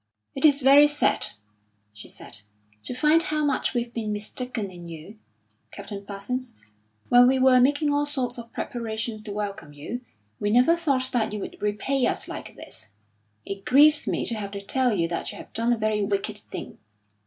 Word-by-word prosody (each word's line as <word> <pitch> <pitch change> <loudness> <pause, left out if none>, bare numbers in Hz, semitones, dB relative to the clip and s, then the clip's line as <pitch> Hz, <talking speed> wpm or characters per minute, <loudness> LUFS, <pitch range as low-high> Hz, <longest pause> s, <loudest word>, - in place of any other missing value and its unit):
"It's 285 0 +4
very 280 +3 +7
sad," 295 0 +2 0.7
she 105 - -12
said, - - -8 0.5
"to - - -3
find 305 +5 +4
how 305 -2 0
much 280 -2 0
we've 240 0 -2
been 220 -2 -3
mistaken 210 0 -3
in 175 -1 -10
you, 170 +6 -10 0.5
Captain 200 -2 -8
Parsons. 210 +6 -5 0.5
When 245 0 +7
we 265 +1 +3
were 260 -1 +5
making 290 +3 +2
all 290 0 +1
sorts 255 -4 -1
of 235 0 -10
preparations 220 -2 -4
to 215 -1 -7
welcome 200 -7 -5
you, 155 +12 -6 0.4
we 205 - 0
never 250 +9 +5
thought 275 -6 0
that 220 -4 0
you 210 - -3
would - - -8
repay 210 +6 0
us - - -2
like - - -8
this. - - -6 0.6
It 195 0 -6
grieves 295 +3 +5
me - - -1
to - - -2
have 210 -3 -4
to 200 - -5
tell 255 +5 +1
you 170 -6 +1
that 170 - -3
you - - -10
have - - -12
done 230 +2 +1
a 240 - +2
very 215 -1 0
wicked 205 +1 -1
thing. - - -9
235 Hz, 185 wpm, -25 LUFS, 205-265 Hz, 0.7 s, very